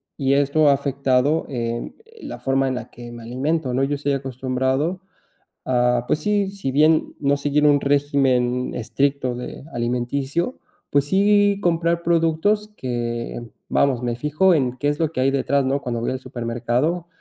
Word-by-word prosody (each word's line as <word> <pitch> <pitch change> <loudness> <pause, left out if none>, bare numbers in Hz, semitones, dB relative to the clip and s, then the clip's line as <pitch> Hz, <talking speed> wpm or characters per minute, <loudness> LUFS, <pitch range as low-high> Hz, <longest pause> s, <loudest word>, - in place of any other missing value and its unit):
y 135 -1 0
esto 145 +2 +3
ha - - +6
afectado, 140 +1 +1
eh, 120 -2 -3 0.3
la - - -7
forma 135 0 +1
en 130 - -2
la 125 - -6
que 120 0 -11
me 120 -1 -10
alimento, 130 +4 -1
¿no?, 130 +2 +1
yo 145 +1 0
estoy 145 0 -1
acostumbrado 130 +5 -1 0.6
a, 125 -1 +2
pues, 150 - +1
sí 205 +3 0
si 195 -10 -4
bien 155 +3 +3
no 140 0 +2
seguir 145 +1 +1
un 145 -1 +4
régimen 135 -3 +1
estricto 125 +2 -1
de, 125 +2 -8
alimenticio, 130 - -2 0.3
pues, 140 -1 +3
sí, 200 +4 +3
comprar 170 -1 +1
productos 170 +6 +1
que, 120 -1 -3 0.2
vamos, 130 -3 +1
me 120 -1 -1
fijo 150 +9 +2
en 130 -5 0
qué 145 - -1
es 145 +1 0
lo 160 -2 0
que 145 - -5
hay 135 +1 +3
detrás, 140 0 +1
¿no?, 140 +1 0
cuando 120 -2 -3
voy 115 - -2
al 130 - -3
supermercado, 120 +9 -2
140 Hz, 165 wpm, -22 LUFS, 125-155 Hz, 0.6 s, ha